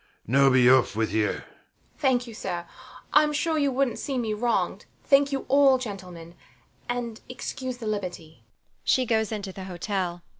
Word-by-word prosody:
Now 135 +4 +4
be 130 -2 +5
off 130 -5 +5
with 110 0 -1
you. 110 -1 +2
THE - - -1
MAID. - - -8 0.6
Thank 260 -4 +2
you, 235 - -10
sir. 175 -5 -4 0.5
I'm 300 0 +5
sure 315 +1 0
you 285 -2 +2
wouldnt 265 -2 0
see 275 -2 -3
me 225 -3 -1
wronged. 235 +2 -1 0.2
Thank 280 0 +4
you 270 -1 -2
all, 275 0 +5
gentlemen; 185 -8 -8 0.6
and 235 -2 -3
excuse 255 0 -5
the 235 - -8
liberty. 175 - -5
235 Hz, 145 wpm, -26 LUFS, 170-270 Hz, 0.6 s, be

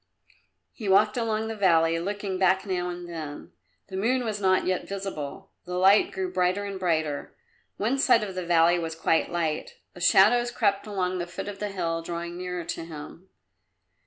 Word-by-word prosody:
He 215 -5 -5
walked 210 +2 +4
along 220 -2 -1
the 225 - -4
valley, 165 -4 +3
looking 195 +1 -3
back 190 +1 +3
now 180 -2 -2
and 175 0 -6
then; 155 -4 -7 0.4
the 190 - -7
moon 245 +6 +1
was 210 -2 -3
not 185 -1 +3
yet 185 0 -1
visible. 195 -8 -6
The 180 0 -5
light 195 +3 +5
grew 185 -1 -3
brighter 185 +2 +1
and 200 -1 -5
brighter; 155 -5 -1 0.4
one 240 +7 0
side 230 -5 +4
of 195 -2 -5
the 185 0 -4
valley 170 0 +4
was 165 -1 -4
quite 160 0 +1
light. 165 -3 -2 0.2
The 180 - -12
shadows 235 +7 +5
crept 205 -5 0
along 185 -3 -1
the 175 - -3
foot 175 +3 -6
of 200 -1 -6
the 210 - -2
hill, 170 -4 -2
drawing 170 +1 -5
nearer 180 -1 -4
to - - -4
him. 165 +3 -10
185 Hz, 185 wpm, -26 LUFS, 170-205 Hz, 0.4 s, light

